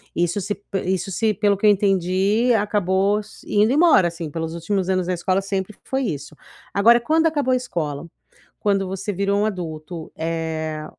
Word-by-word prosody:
isso 175 +3 0
se 205 +2 -4 0.2
isso 190 +1 -1
se 220 +3 +1
pelo 205 0 +2
que 200 +2 -2
eu - - +8
entendi, 195 +4 +2
acabou 205 -1 +1 0.2
indo 210 +3 +2
embora 300 - +5
assim, 170 -2 -6
pelos 165 +1 -4
últimos 185 +2 -2
anos 185 -2 0
na 185 - 0
escola 185 +2 0
sempre 195 +1 -4
foi 265 0 -1
isso, 150 - -4 0.4
agora 230 +4 +5
quando 320 +7 +2
acabou 290 -5 +1
a - - +4
escola, 165 - -4 0.5
quando 195 -2 +1
você 195 +2 -4
virou 200 +2 0
um - - +2
adulto, 165 -4 -5
eh, 160 -1 -3
195 Hz, 170 wpm, -22 LUFS, 170-210 Hz, 0.5 s, eu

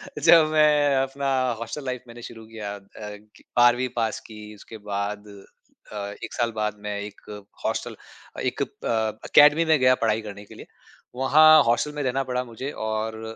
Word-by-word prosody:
तो - - -6
जब 165 -2 +7
मैं 150 -2 +4
अपना 135 +1 -1 0.3
हॉस्टल 115 +5 -6
लाइफ़ 125 -1 -4
मैंने 120 0 -12
शुरू 115 -1 -12
किया 105 -2 -6
अ 100 - -12 0.2
ग 105 0 -11 0.2
12वी 120 +1 +4
पास 115 -2 -1
की 110 -1 -12 0.2
उसके 110 +2 -12
बाद 100 +1 -3
अ, 100 +1 -17 0.3
1 - - -7
साल 120 -1 -1
बाद 105 0 -2
मैं 105 0 -3
एक 105 0 -9 0.4
हॉस्टल - - -3 0.4
अ, - - -5
एक - - -2
अ, - - -5 0.6
अकेडमी 150 +3 +6
में 155 - +6
गया 130 0 +4
पढ़ाई 110 0 +1
करने 100 +1 -10
के - - -15
लिए। - - -12 0.5
वहाँ 140 +5 +5 0.2
हॉस्टल 120 +5 +1
में - - -1
रहना 135 +1 -1
पड़ा 125 0 -1
मुझे 130 +5 -6 0.2
और 110 0 -3
120 Hz, 180 wpm, -24 LUFS, 105-135 Hz, 0.6 s, जब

